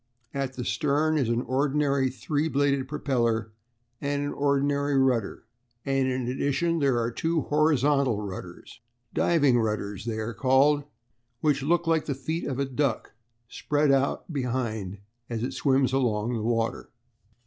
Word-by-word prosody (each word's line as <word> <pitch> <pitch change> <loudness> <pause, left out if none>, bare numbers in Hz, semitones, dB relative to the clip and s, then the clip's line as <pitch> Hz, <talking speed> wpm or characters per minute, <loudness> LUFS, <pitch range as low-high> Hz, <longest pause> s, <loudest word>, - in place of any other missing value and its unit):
At 135 -1 -2
the 125 - -4
stern 155 +2 +1
is 125 -5 0
an 120 +1 0
ordinary 140 0 +1
three 145 +5 -2
bladed 140 -2 +1
propeller 115 -6 -1 0.5
and 145 0 -1
an 145 - -3
ordinary 140 0 +1
rudder, 125 -6 +1 0.4
and 135 -1 +1
in 130 -1 -1
addition 145 +6 0
there 135 -4 +2
are 115 +1 -1
two 165 +6 0
horizontal 145 -6 +2
rudders 95 +1 -8 0.3
"diving 145 -8 +3
rudders" 105 -2 -2
they 115 -2 -3
are 110 +1 -3
called 140 +3 +3 0.6
which 145 -3 +2
look 170 +4 +1
like 165 -1 +1
the 140 - -2
feet 160 +5 -3
of 130 - -3
a 140 - 0
duck 135 -3 -1 0.4
spread 145 +3 +1
out 135 +4 0
behind 115 -7 -2 0.3
as 115 -1 -3
it 125 - -2
swims 135 -2 +2
along 120 -3 0
the 115 - -2
water. 115 0 -1
135 Hz, 150 wpm, -26 LUFS, 120-145 Hz, 0.6 s, diving